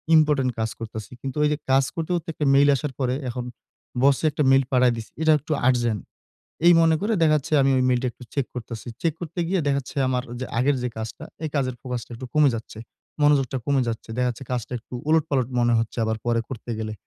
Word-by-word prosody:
Important 150 -5 +3
কাজ 110 - 0
করতেছি। 110 -1 -7
কিন্তু 135 +1 -5
ওই - - +5
যে 150 - 0
কাজ 135 +1 +5
করতে, 165 +1 -3
করতে 170 0 -4
একটা 150 - -2
মেইল 140 +1 +6
আসার 140 +1 -3
পরে 125 -1 +1 0.2
এখন 120 0 -4 0.6
বসে 140 +2 +4
একটা 150 0 0
মেইল 135 0 +5
পাঠায় 125 -2 +4
দিছে। 110 - -8
এটা 160 0 +4
একটু 150 - -8 0.2
আর্জেন্ট। 120 -5 +1 0.6
এই 175 - +8
মনে 160 -1 +4
করে 215 +3 +1
দেখা 155 -2 +5
যাচ্ছে 150 +2 -5
আমি 135 - +3
ওই 130 - +2
মেইল 125 -1 +3
টা - - +1
একটু 125 - -14
চেক 140 -3 0
করতেছি। 120 -1 -7
চেক 165 -2 +1
করতে 170 +1 -6
গিয়ে 190 0 +1
দেখা 140 - +2
যাচ্ছে 135 - -11
আমার 125 -1 0 0.2
যে 130 - -3
আগের 140 +3 +3
যে 125 - -1
কাজটা 110 0 -6 0.2
এই 155 - -1
কাজের 130 -3 0
ফোকাস 125 -2 -4
টা - - -29
একটু 130 +3 -7
কমে 150 -2 +5
যাচ্ছে। 110 -1 -8 0.4
মনোযোগটা 135 -3 +3
কমে 140 -2 +2
যাচ্ছে। 115 0 -4
দেখা 125 0 +2
যাচ্ছে 120 +2 -6
কাজটা 125 -1 -3
একটু 115 - -16 0.2
উলটপালট 145 -6 +2
মনে 120 0 +3
হচ্ছে, 115 +1 -4
আবার 110 0 -1
পরে 120 -1 +2
করতে 120 -1 -6
গেলে। 110 -1 -3
130 Hz, 230 wpm, -24 LUFS, 120-150 Hz, 0.6 s, এই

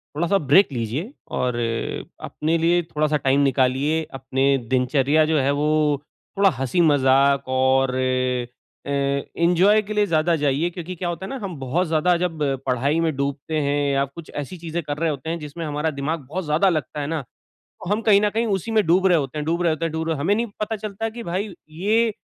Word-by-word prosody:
थोड़ा-सा 170 +6 +2
ब्रेक 155 +4 +5
लीजिये, 130 - -3 0.2
और 125 -1 -1 0.7
अपने 160 +2 -1
लिए 170 +2 +3
थोड़ा-सा 155 -1 0
टाइम 135 0 +2
निकालिए, 135 +4 +1
अपने 135 +1 +1
दिनचर्या 135 +4 +2
जो 160 0 +1
है 135 +1 +2
वो 150 0 +1 0.4
थोड़ा 200 0 +5
हँसी-मज़ाक 140 -1 +3
और 130 0 +2
अ, - - -1 0.9
एन्जॉय 170 +8 +2
के 215 0 -6
लिए 210 0 +2
ज़्यादा 165 -2 +2
जाइए 145 +2 +1
क्योंकि 175 +1 -7
क्या 175 0 -3
होता 175 +2 -5
है - - -7
ना - - -4
हम 190 -3 -4
बहुत 135 +8 -1
ज़्यादा 165 +3 +2
जब 170 -3 -3 0.2
पढ़ाई 135 +5 +1
में 165 -3 0
डूबते 140 +3 -2
हैं 145 0 0 0.2
या 135 0 +2
कुछ 155 +4 -12
ऐसी 145 +6 -5
चीज़ें 170 0 -4
कर 145 0 -4
रहे 165 +1 0
होते 145 +1 -4
हैं 170 +1 -2
जिसमें 150 +2 -6
हमारा 150 +1 -1
दिमाग़ 155 +3 -2
बहुत 160 +7 -5
ज़्यादा 155 +6 +3
लगता 155 -3 -2
है 140 - -3
ना, 160 -1 -2 0.4
तो 180 - -11
हम 210 +2 +1
कहीं 210 -3 +5
न 210 - +2
कहीं 225 +3 0
उसी 200 0 -2
में 220 -2 +3
डूब 180 +3 +3
रहे 180 -3 +5
होते 140 +1 -4
हैं, 150 - -2
डूब 170 +2 0
रहे 170 -2 +2
होते 155 +1 -3
हैं, 165 - -2
डूब 160 0 -3
रहे 165 - +1
हैं - - -6
हमें 180 +8 +2
नहीं 230 +3 0
पता 215 +1 -2
चलता 210 0 -6
है 225 - 0
कि 235 +2 -8
भाई 190 +1 -3 0.2
ये 215 +8 +1
155 Hz, 210 wpm, -22 LUFS, 140-180 Hz, 0.9 s, ब्रेक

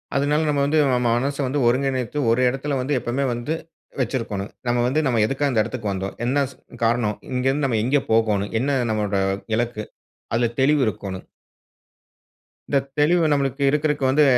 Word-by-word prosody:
அதுனால 145 +3 +2
நம்ம 145 -1 +1
வந்து 150 +3 +1 0.2
நம்ம - - +3 0.2
மனச 140 +4 -1
வந்து 140 +3 -1
ஒருங்கிணைத்து 130 +1 0
ஒரு 120 +2 +2
எடத்துல 135 +2 -2
வந்து 135 +3 -1
எப்பமே 125 +4 -2
வந்து 120 +6 -3 0.5
வச்சிருக்கோனும். 115 -5 -3 0.2
நம்ம 120 0 +2
வந்து 135 +5 +1
நம்ம 120 -5 +2
எதுக்காக 135 +4 0
இந்த 115 -4 +3
எடத்துக்கு 110 -4 -4
வந்தோம்? 95 +1 -4
என்ன 140 +3 +2
ஸ் - - -17 0.3
காரணம்? 115 -2 +1 0.2
இங்கேருந்து 135 +3 +1
நம்ம 120 -5 +1
எங்கே 135 +4 +2
போகோனும்? 105 -3 +2
என்ன 135 +2 +1
நம்மோட 105 -2 0 0.4
இலக்கு? 115 -1 -2 0.5
அதுல 120 0 +2
தெளிவு 145 +2 +4
இருக்கோன்னு. 95 -2 -4 1.5
இந்த 140 - +3 0.2
தெளிவு 165 +3 +4
நமக்கு 140 -1 0
இருக்கறக்கு 150 -1 0
வந்து, 145 +3 +4
130 Hz, 160 wpm, -22 LUFS, 115-140 Hz, 1.5 s, தெளிவு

